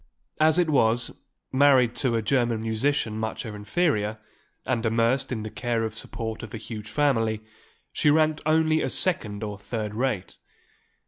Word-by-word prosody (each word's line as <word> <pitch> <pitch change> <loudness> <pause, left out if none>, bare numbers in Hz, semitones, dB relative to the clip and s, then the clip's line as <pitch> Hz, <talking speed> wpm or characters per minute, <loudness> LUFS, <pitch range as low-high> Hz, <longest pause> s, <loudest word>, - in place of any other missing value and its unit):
As 155 +1 +4
it 175 -2 +3
was, 120 -5 +2 0.4
married 130 -3 +5
to 125 -4 +1
a 115 - 0
German 120 -2 +1
musician 110 0 0
much 110 0 -3
her 110 -3 -6
inferior, 105 -1 0 0.5
and 120 -3 0
immersed 115 +4 +1
in 110 -4 -3
the 110 - -6
care 120 -2 -1
and 110 -1 -3
support 110 0 -5
of 110 -1 -8
a - - -3
huge 110 -1 -7
family, 115 -7 +1 0.5
she 150 - +2
ranked 155 0 +3
only 155 0 +3
as - - -1
second 110 - 0
or 105 -2 -5
third 105 0 -4
rate. 120 -4 -2
115 Hz, 165 wpm, -26 LUFS, 110-140 Hz, 0.5 s, married